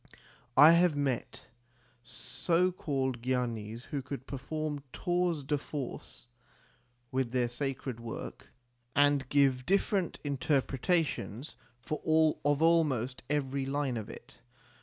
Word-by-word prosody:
I 150 Hz, +4 st, +10 dB
have 170 Hz, -2 st, +4 dB
met 135 Hz, -4 st, -2 dB, 0.6 s
so 130 Hz, +11 st, 0 dB
called 135 Hz, -8 st, -2 dB
gyanis 120 Hz, -3 st, -2 dB
who 140 Hz, +1 st, -4 dB
could 135 Hz, -1 st, -7 dB
perform 145 Hz, +2 st, -4 dB
tours 175 Hz, -4 st, 0 dB
de 145 Hz, +1 st, 0 dB
force 135 Hz, -, -7 dB, 0.9 s
with 130 Hz, -2 st, 0 dB
their 125 Hz, -1 st, +1 dB
sacred 130 Hz, -1 st, -4 dB
work, 115 Hz, -1 st, -7 dB, 0.4 s
and 145 Hz, -2 st, +3 dB
give 135 Hz, -3 st, +3 dB
different 195 Hz, +1 st, +1 dB
interpretations 140 Hz, -, -1 dB, 0.3 s
of -, -, -14 dB, 0.7 s
almost 140 Hz, -7 st, +2 dB
every 140 Hz, -2 st, -1 dB
line 140 Hz, -2 st, -1 dB
of 110 Hz, -2 st, -5 dB
it. -, -, -12 dB
140 Hz, 105 wpm, -31 LUFS, 125-150 Hz, 0.9 s, I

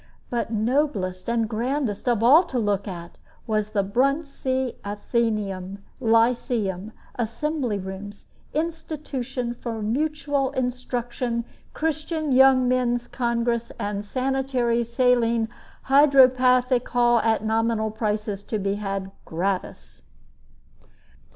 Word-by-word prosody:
But 235 Hz, -2 st, -1 dB
noblest 220 Hz, -5 st, 0 dB
and 230 Hz, -1 st, +1 dB
grandest 240 Hz, 0 st, -1 dB
of 230 Hz, -2 st, +1 dB
all 280 Hz, +8 st, +8 dB
to 260 Hz, -, -4 dB
look 205 Hz, -3 st, 0 dB
at 170 Hz, -3 st, -8 dB, 0.3 s
was 215 Hz, -1 st, 0 dB
the 205 Hz, -2 st, 0 dB
"Bruntsea 260 Hz, +2 st, 0 dB
Athenaeum, 205 Hz, -3 st, -2 dB, 0.2 s
Lyceum, 225 Hz, -4 st, +1 dB, 0.3 s
Assembly 245 Hz, 0 st, -1 dB
Rooms, 195 Hz, +2 st, -8 dB, 0.3 s
Institution 295 Hz, -6 st, -3 dB
for 230 Hz, -2 st, -5 dB
Mutual 285 Hz, +3 st, 0 dB
Instruction, 245 Hz, -2 st, -2 dB, 0.3 s
Christian 315 Hz, -1 st, -2 dB
Young 260 Hz, -1 st, +6 dB
Men's 245 Hz, -1 st, +1 dB
Congress, 235 Hz, -1 st, -1 dB
and 205 Hz, 0 st, -3 dB
Sanitary, 255 Hz, 0 st, 0 dB
Saline, 235 Hz, -1 st, +2 dB, 0.4 s
Hydropathic 255 Hz, -3 st, +5 dB
Hall, 240 Hz, -1 st, +4 dB
at 220 Hz, -1 st, +1 dB
nominal 220 Hz, 0 st, +1 dB
prices 210 Hz, -2 st, -2 dB
to 215 Hz, -, -3 dB
be 195 Hz, -1 st, -1 dB
had 195 Hz, -1 st, -3 dB
gratis." 165 Hz, -, -3 dB
235 Hz, 100 wpm, -24 LUFS, 210-260 Hz, 0.4 s, all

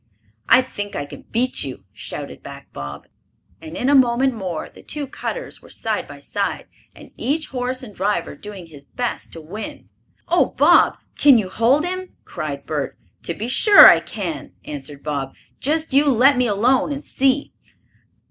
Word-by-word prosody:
"I 255 Hz, +3 st, +7 dB
think 205 Hz, -5 st, -6 dB
I 145 Hz, -, -3 dB
can -, -, -12 dB
beat 250 Hz, +3 st, +1 dB
you!" 130 Hz, -8 st, -7 dB
shouted -, -, -7 dB
back -, -, -11 dB
Bob, 70 Hz, 0 st, -7 dB, 0.6 s
and 160 Hz, +2 st, -8 dB
in 250 Hz, -, -1 dB
a 285 Hz, -, +4 dB
moment 260 Hz, 0 st, +4 dB
more 185 Hz, -7 st, -4 dB
the -, -, -16 dB
two 295 Hz, -1 st, -5 dB
cutters -, -, -6 dB
were -, -, -16 dB
side -, -, -2 dB
by -, -, -11 dB
side, -, -, -3 dB, 0.3 s
and -, -, -14 dB
each 305 Hz, +4 st, -1 dB
horse 255 Hz, 0 st, -3 dB
and 215 Hz, -5 st, -10 dB
driver 200 Hz, +2 st, -1 dB
doing 205 Hz, -4 st, -9 dB
his 150 Hz, -4 st, -14 dB
best 245 Hz, -, -4 dB
to 165 Hz, -, -8 dB
win. 195 Hz, +8 st, -8 dB, 0.4 s
"Oh, 350 Hz, -, +2 dB
Bob, -, -, +5 dB, 0.2 s
can 280 Hz, -4 st, +6 dB
you 200 Hz, -4 st, -1 dB
hold 250 Hz, -, +2 dB
him?" 370 Hz, +1 st, -5 dB
cried 150 Hz, -4 st, -5 dB
Bert. 150 Hz, -3 st, -3 dB, 0.2 s
"To 170 Hz, -, -4 dB
be 220 Hz, -, -4 dB
sure 405 Hz, -, +8 dB
I -, -, +8 dB
can!" -, -, -5 dB
answered 145 Hz, -1 st, -8 dB
Bob. 140 Hz, -3 st, -3 dB, 0.2 s
"Just 310 Hz, +1 st, -1 dB
you 280 Hz, +2 st, +5 dB
let 265 Hz, +3 st, +5 dB
me 250 Hz, -1 st, +2 dB
alone 240 Hz, +7 st, +2 dB
and 285 Hz, +1 st, -5 dB
see." 270 Hz, +1 st, +1 dB
235 Hz, 175 wpm, -21 LUFS, 165-270 Hz, 0.6 s, sure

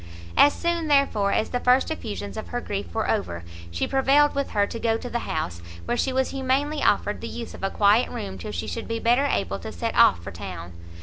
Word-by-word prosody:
As 290 Hz, -, +7 dB
soon, 340 Hz, -2 st, -1 dB
therefore, 275 Hz, -9 st, +3 dB
as -, -, +1 dB
the 245 Hz, -, 0 dB
first 250 Hz, +4 st, +3 dB
effusions 210 Hz, -9 st, -5 dB
of 220 Hz, -, -6 dB
her 245 Hz, -, -3 dB
grief 205 Hz, -4 st, -5 dB
were 220 Hz, -, -1 dB
over, 85 Hz, -, -1 dB, 0.3 s
she 85 Hz, 0 st, -1 dB
prevailed 275 Hz, +2 st, +4 dB
with 280 Hz, 0 st, -1 dB
her 205 Hz, -1 st, +2 dB
to 230 Hz, -, -6 dB
go 225 Hz, -1 st, +1 dB
to 245 Hz, -, -7 dB
the 235 Hz, -, -3 dB
house, 90 Hz, -, -3 dB, 0.2 s
where 240 Hz, -, 0 dB
she 265 Hz, -, 0 dB
was 260 Hz, 0 st, 0 dB
humanely 275 Hz, +3 st, 0 dB
offered 205 Hz, 0 st, +1 dB
the 230 Hz, -, -5 dB
use 235 Hz, 0 st, -7 dB
of -, -, -11 dB
a 195 Hz, -, 0 dB
quiet 210 Hz, +4 st, +3 dB
room 95 Hz, -1 st, -6 dB
till 90 Hz, -, -6 dB
she 85 Hz, -, -3 dB
should 230 Hz, -, -5 dB
be 230 Hz, -, -2 dB
better 240 Hz, +5 st, +3 dB
able 100 Hz, -, -1 dB
to 110 Hz, -, -7 dB
set 85 Hz, -, -3 dB
off 85 Hz, -, +5 dB
for 100 Hz, -, -6 dB
town. 85 Hz, 0 st, -8 dB
230 Hz, 235 wpm, -25 LUFS, 195-265 Hz, 0.3 s, As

